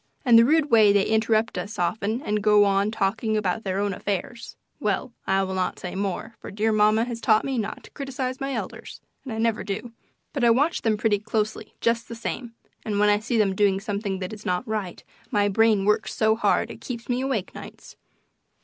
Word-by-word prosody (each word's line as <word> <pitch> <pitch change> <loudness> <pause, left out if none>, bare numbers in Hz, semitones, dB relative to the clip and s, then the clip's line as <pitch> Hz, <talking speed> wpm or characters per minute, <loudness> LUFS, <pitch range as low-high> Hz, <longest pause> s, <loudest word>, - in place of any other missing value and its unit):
And 240 -2 +6
the 230 0 +8
rude 305 +1 +2
way 215 -3 +6
they 200 -1 +3
interrupt 220 0 +1
us 210 +2 -6
often 215 - -1
and 210 -6 -1
go 210 0 +5
on 200 +1 +2
talking 215 +1 0
about 210 +1 -1
their 190 -1 -2
own 200 0 0
affairs 205 +5 -4 0.2
well, 210 +3 -1
I 195 0 +2
will 190 0 -3
not 185 -1 -1
say 180 - -6
more, 200 +3 -3
for - - -9
dear 215 +2 0
mamma 215 +1 +3
has 235 -2 -6
taught 215 -1 +3
me 265 -3 -1
not 215 - -4
to - - -15
criticise 265 -2 -4
my 275 0 -2
elders, - - -6 0.2
and 260 - -7
I 220 - -4
never 225 -1 0
do. 210 +4 -5 0.4
But 275 - -2
I 235 - +6
watch 285 +8 +2
them 220 -2 +1
pretty 210 -1 +1
closely, 215 0 -3
just 230 0 +1
the 230 - -7
same, 230 +1 -5 0.3
and 210 -2 -2
when 210 0 +4
I 205 0 +3
see 235 +2 -2
them 205 -3 +2
doing 195 -1 +2
something 200 -1 -3
that 185 +2 -5
is 210 -1 -10
not 180 +7 -2
right 210 -5 -4 0.3
my 205 -3 +2
brain 210 -1 +3
works 210 +2 +1
so 220 0 +3
hard 225 - +1
it - - -11
keeps 235 -2 -6
me 245 0 0
awake 260 -8 -2
nights. - - -11
215 Hz, 215 wpm, -24 LUFS, 200-230 Hz, 0.4 s, the